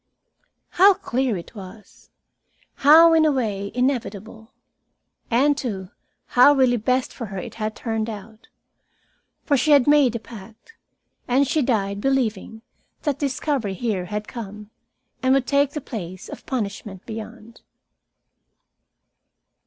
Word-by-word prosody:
How 390 +2 +5
clear 260 - -1
it 170 - -10
was! 205 0 -13 0.7
How, 325 +4 +7
in 320 -1 +5
a 310 - +4
way, 205 -7 -2
inevitable! 225 -3 -3 0.8
And, 275 +5 +3
too, 200 -9 -5 0.3
how 250 +4 +6
really 255 -3 +3
best 255 +4 0
for 230 - -6
her 195 -1 -7
it 180 - -6
had 215 0 -2
turned 225 -1 -3
out. 215 +1 -10 1.0
For 290 - +2
she 295 +3 +1
had 280 -4 +5
made 290 -5 +4
a - - -2
pact, 220 - -14 0.5
and 265 +3 +2
she 310 +3 +1
died 200 -6 -1
believing 225 -4 -1 0.4
that 285 -3 -1
discovery 270 -6 -2
here 200 -4 -2
had 210 +3 -5
come, 210 -2 -9 0.5
and 260 +1 +3
would 270 -2 +1
take 280 0 +1
the 300 - -4
place 190 -4 -7
of - - -10
punishment 205 -5 -5
beyond. 225 +1 -9
235 Hz, 130 wpm, -22 LUFS, 210-270 Hz, 1.0 s, How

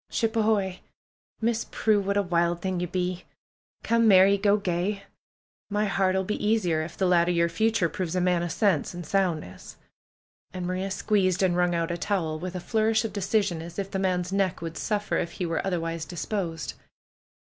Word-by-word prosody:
"Ship 225 0 -1
ahoy 220 -2 +3
I 190 -1 -6 0.6
Miss 230 0 0
Prue; 215 -2 +2
what 200 +1 -1
a 200 - +3
wild 170 -1 +1
thing 185 0 -2
you 180 - -2
be! 180 0 -2 0.6
Come 230 0 +3
merry, 195 0 +7
go 200 +1 +3
gay! 195 +1 -2 0.7
My 210 +1 0
heart 195 -2 +1
'ull 190 - +1
be 210 +3 -3
easier 200 -7 +2
if 155 - -7
the 190 - +1
lad 175 -1 +4
o' - - +3
yer 170 -1 +2
future 215 +2 +1
proves 175 +1 -4
a - - +2
man 180 -1 +2
o' 175 - -1
sense 175 -2 +1
and 175 -1 -6
soundness." 170 - -2 0.8
And 180 -1 -3
Maria 185 +2 -2
squeezed 190 -2 +1
and 185 -2 +3
Avrung 175 0 +2
out 165 0 -1
a 170 - -3
towel 165 -6 -1
with 185 +2 -5
a - - -2
flourish 220 +3 +1
of 215 - -4
decision, 200 -3 0
as 170 +1 -9
if 195 -1 -3
the 190 - -2
man's 180 -1 0
neck 195 -2 +1
would 165 0 -6
suffer 210 -1 -1
if 165 - -2
he 180 - -3
were 165 -1 -1
otherwise 165 -3 -2
disposed. 170 -1 -4
185 Hz, 200 wpm, -26 LUFS, 175-205 Hz, 0.8 s, merry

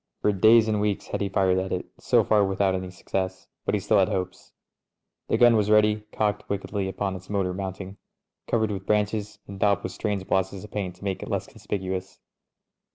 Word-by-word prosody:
For 105 - +4
days 110 +3 +6
and 105 -1 +1
weeks 105 -2 -1
had - - -4
he 100 - 0
fired 95 -1 +2
at 95 0 -3
it, 90 - -2
so - - +3
far 105 -2 +3
without 95 0 +1
any 95 0 -3
success^ 95 +1 -4 0.2
but - - +1
he - - +1
still - - +3
had - - +3
hopes. 95 0 -4 0.8
The - - +1
gun 120 -1 +6
was 105 -1 +2
ready, 105 0 +4
cocked 105 -1 -1
wickedly 100 0 -2
upon 95 0 -2
its 95 0 -11
motor 95 -3 0
mount 95 0 -5
ing, 95 +1 -9 0.5
covered 110 -2 +1
with 95 -1 -5
branches 105 0 0
and 100 -1 -8
daubed 100 0 +2
with - - -3
strange 100 -3 -2
blotches 95 0 0
of 105 - -11
paint 95 -4 -3
to 90 - -16
make 95 -2 -2
it - - -6
less - - -1
conspicuous. 95 -1 -5
100 Hz, 210 wpm, -26 LUFS, 95-105 Hz, 0.8 s, days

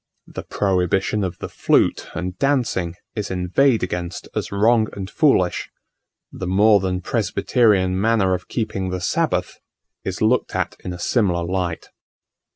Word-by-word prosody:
The - - -7
prohibition 95 +1 0
of 90 -2 -3
the - - -6
flute - - +1
and 90 +1 -3
dancing 120 -11 0 0.2
is 105 -2 -3
inveighed 95 +8 +2
against 90 -1 -4
as - - -3
wrong 110 +2 +3
and 95 -1 -5
foolish; 105 - +2 0.6
the 95 - -6
more 100 +3 +5
than 90 -1 -2
presbyterian 95 -2 +1
manner 105 -4 +2
of 90 0 -4
keeping 105 -5 -2
the 90 0 -3
sabbath - - -1 0.4
is 95 - -4
looked 115 +3 +1
at - - -1
in 90 - -4
a 90 - -6
similar 90 -3 +1
light. 90 -2 -3
95 Hz, 145 wpm, -21 LUFS, 90-110 Hz, 0.6 s, more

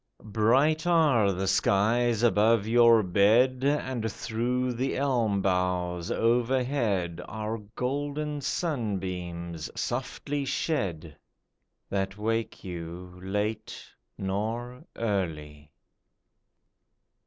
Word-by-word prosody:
Bright 135 +10 +3
are 145 - +4
the 95 +1 -2
skies 115 +5 +2
above 110 -2 +4
your 115 -1 +6
bed, 115 +8 +3
And 130 -6 0
through 125 +3 -1
the 130 +3 -2
elm 120 -8 +1
boughs 90 -2 0
overhead 115 - +1
Are 110 +1 -4 0.2
golden 145 +3 -2
sunbeams 90 - -3
softly 145 0 -3
shed, 95 - -2 0.8
That 95 0 -2
wake 115 +2 -2
you 90 0 -7
late 105 +3 -3 0.3
nor 115 +6 -3
early. 75 -9 -3
110 Hz, 85 wpm, -28 LUFS, 95-125 Hz, 0.8 s, your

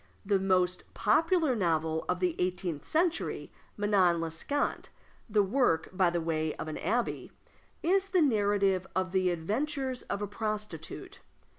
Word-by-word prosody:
The 200 -1 +2
most 185 -1 0
popular 320 - +3
novel 160 -5 0
of 180 0 0
the 180 -2 +1
eighteenth 180 -4 -2
century 330 +1 0 0.3
Manon 195 -5 +3
Lescant 165 - -2 0.4
the 210 -1 +4
work, 195 -6 +1
by 185 -1 +3
the 170 0 -1
way, 160 -1 -1
of - - -6
an 155 - -4
abbé, 240 +1 -1 0.5
is 385 +3 +2
the 365 -3 +4
narrative 200 -6 +2
of 185 -1 0
the 185 -1 +2
adventures 255 - -2
of 200 - -4
a - - -2
prostitute. 210 -6 -5
195 Hz, 140 wpm, -30 LUFS, 175-245 Hz, 0.5 s, the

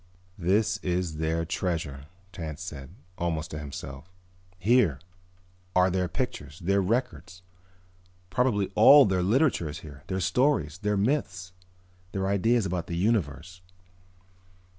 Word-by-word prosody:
"This 95 +5 +2
is 90 -3 -2
their 80 +1 -1
treasure," 80 -6 -3 0.3
Tance 80 0 -6
said, 75 -7 -8 0.3
almost 85 -1 -2
to 75 - -5
himself. 70 +1 -8 0.5
"Here 100 - +3 0.8
are 90 0 +4
their 90 0 0
pictures, 70 -3 -4
their 100 +3 +1
records. 100 -4 -2 0.9
Probably 105 -3 +1
all 140 +7 +8
their 95 -2 +1
literature 110 - +2
is 75 - -7
here, 70 -3 -11
their 95 0 -2
stories, 90 - +1
their 105 0 0
myths, 95 - -1 0.6
their 95 -1 -1
ideas 100 +3 +2
about 90 -2 -3
the 85 - -3
universe." 90 - -1
90 Hz, 120 wpm, -27 LUFS, 80-100 Hz, 0.9 s, all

